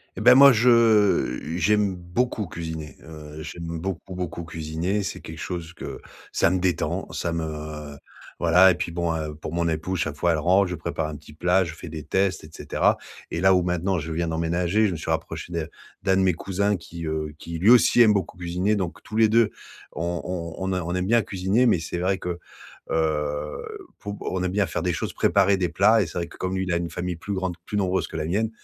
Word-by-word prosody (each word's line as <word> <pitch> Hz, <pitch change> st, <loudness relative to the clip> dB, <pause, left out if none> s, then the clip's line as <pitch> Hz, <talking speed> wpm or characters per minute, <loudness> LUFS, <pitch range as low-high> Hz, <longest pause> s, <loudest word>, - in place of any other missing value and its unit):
Et -, -, -5 dB
bah, 125 Hz, +3 st, +8 dB
moi, 140 Hz, 0 st, +9 dB
je 110 Hz, -, +4 dB, 0.2 s
j'aime 100 Hz, +1 st, +2 dB
beaucoup 95 Hz, +4 st, -2 dB
cuisiner. 80 Hz, -2 st, -6 dB
Heu, 75 Hz, -1 st, -9 dB
j'aime 85 Hz, 0 st, -6 dB
beaucoup, 95 Hz, 0 st, -5 dB
beaucoup 85 Hz, -1 st, -4 dB
cuisiner. 85 Hz, +5 st, -2 dB
C'est -, -, -5 dB
quelque 80 Hz, 0 st, -9 dB
chose 85 Hz, -2 st, -5 dB
que -, -, -8 dB, 0.3 s
ça -, -, +3 dB
me 95 Hz, 0 st, +1 dB
détend, 90 Hz, -1 st, -1 dB
ça 85 Hz, -, -2 dB
me 75 Hz, -2 st, -5 dB, 0.4 s
voilà. 90 Hz, +2 st, +6 dB
Et -, -, 0 dB
puis 85 Hz, -, -3 dB
bon, 85 Hz, -1 st, -1 dB
heu, 75 Hz, -1 st, -4 dB
pour 80 Hz, +1 st, -7 dB
mon 85 Hz, 0 st, 0 dB
épouse, 80 Hz, +3 st, -2 dB
chaque 75 Hz, -3 st, -1 dB
fois, 85 Hz, +3 st, +1 dB
elle 80 Hz, -, +1 dB
rentre, 95 Hz, +4 st, +4 dB
je 90 Hz, -, -3 dB
prépare 80 Hz, -1 st, -3 dB
un 75 Hz, -, -6 dB
petit 75 Hz, 0 st, -13 dB
plat, 90 Hz, +4 st, +2 dB
je 80 Hz, -2 st, -6 dB
fais 85 Hz, -, -9 dB
des 80 Hz, -2 st, -6 dB
tests, 95 Hz, 0 st, 0 dB
et 75 Hz, -, -11 dB
cetera. -, -, +1 dB, 0.3 s
Et 85 Hz, -, -3 dB
là, 95 Hz, +1 st, +5 dB
où 90 Hz, -, +4 dB
maintenant, 90 Hz, +1 st, 0 dB
je 80 Hz, +2 st, -5 dB
viens 85 Hz, +1 st, -1 dB
d'emménager, 85 Hz, +6 st, +1 dB
je -, -, -1 dB
me -, -, -4 dB
suis 80 Hz, -, -3 dB
rapproché 80 Hz, +1 st, -3 dB
de 80 Hz, -1 st, -3 dB, 0.3 s
d'un 95 Hz, 0 st, +2 dB
de -, -, +3 dB
mes 95 Hz, -2 st, +3 dB
cousins 100 Hz, +4 st, 0 dB
qui, 85 Hz, -1 st, -8 dB
heu, 75 Hz, -1 st, -3 dB
qui 85 Hz, 0 st, -6 dB
lui 100 Hz, +6 st, +4 dB
aussi, 120 Hz, 0 st, +6 dB
aime 110 Hz, -2 st, +7 dB
beaucoup 95 Hz, -2 st, -2 dB
cuisiner. 90 Hz, +4 st, 0 dB
Donc, 95 Hz, -4 st, -4 dB
tous 110 Hz, -, -9 dB
les 110 Hz, -1 st, +6 dB
2 115 Hz, -1 st, +4 dB, 0.4 s
on 85 Hz, 0 st, -3 dB
on 90 Hz, +1 st, -4 dB
on -, -, 0 dB
a 90 Hz, -, -1 dB
on 85 Hz, +2 st, -3 dB
aime 90 Hz, 0 st, 0 dB
bien 115 Hz, +3 st, +4 dB
cuisiner. 100 Hz, +6 st, +1 dB
Mais 90 Hz, -, +3 dB
c'est 85 Hz, +2 st, -4 dB
vrai 95 Hz, +1 st, +1 dB
que, 90 Hz, -2 st, -4 dB, 0.5 s
heu, 75 Hz, -2 st, -1 dB, 0.4 s
pour 100 Hz, 0 st, -5 dB, 0.2 s
on 95 Hz, -1 st, -1 dB
aime 90 Hz, -, -1 dB
bien 100 Hz, 0 st, +2 dB
faire 80 Hz, -, -3 dB
des 90 Hz, 0 st, 0 dB
choses, -, -, -3 dB
préparer 100 Hz, 0 st, +3 dB
des 90 Hz, -2 st, 0 dB
plats. 110 Hz, +3 st, +4 dB
Et 90 Hz, -, -1 dB
c'est 85 Hz, -, -7 dB
vrai, 85 Hz, -1 st, -2 dB
que -, -, -14 dB
comme 95 Hz, +1 st, -2 dB
lui, 95 Hz, -, 0 dB
il 90 Hz, -2 st, -1 dB
a -, -, +2 dB
une 85 Hz, -1 st, -3 dB
famille 90 Hz, -1 st, -3 dB
plus 100 Hz, +4 st, -5 dB
grande, 95 Hz, -2 st, -2 dB
plus 105 Hz, -, -2 dB
nombreuse 95 Hz, -1 st, 0 dB
que 80 Hz, -, -7 dB
la 75 Hz, -, -2 dB
mienne. 105 Hz, +6 st, 0 dB
90 Hz, 235 wpm, -24 LUFS, 80-95 Hz, 0.5 s, moi